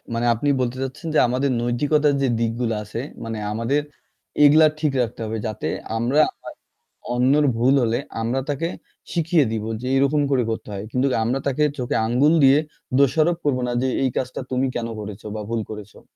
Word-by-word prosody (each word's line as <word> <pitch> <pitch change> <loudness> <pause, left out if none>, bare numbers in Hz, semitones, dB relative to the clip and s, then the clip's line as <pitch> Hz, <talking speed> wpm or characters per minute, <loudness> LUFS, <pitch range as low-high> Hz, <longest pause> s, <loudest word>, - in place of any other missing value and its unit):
মানে 115 +1 0
আপনি 130 +6 -1
বলতে 125 0 -2
চাচ্ছেন 135 +5 -6
যে - - +6
আমাদের 130 +3 0
নৈতিকতার 145 +5 +2
যে 135 - +2
দিকগুলো 115 0 -1
আছে 105 +2 -6 0.2
মানে 115 -1 -4
আমাদের 115 +7 0 0.6
এগুলা 155 +2 +7
ঠিক 150 -2 +1
রাখতে 115 -1 -3
হবে 110 +1 -3
যাতে 110 - -4 0.3
আমরা 120 +6 +1 0.2
হয় - - -9 0.6
অন্যের 135 +5 +3
ভুল 125 +4 +3
হলে 115 0 +1 0.2
আমরা 120 +4 0
তাকে 145 +3 -1 0.5
শিখিয়ে 165 -3 +2
দিব 110 -2 -2 0.2
যে 125 - -4
এরকম 140 +2 +2
করে 130 -3 +3
করতে 115 - -4
হয়। 100 0 -5
কিন্তু 130 +3 +1 0.2
আমরা 125 +4 0
তাকে 140 +2 +1
চোখে 125 -2 -2
আঙ্গুল 130 +7 +3
দিয়ে 135 +1 +7 0.4
দোষারোপ 155 +5 +3
করব 140 -3 +2
না - - -2
যে, 130 - +1 0.2
"এই 130 - +2
কাজটা 130 +1 -3
তুমি 130 +1 +1
কেন 115 -1 -2
করেছো 105 0 -8
বা 110 - -4
ভুল 115 -1 -1
করেছো।" 105 -2 -9
125 Hz, 180 wpm, -22 LUFS, 115-145 Hz, 0.6 s, এগুলা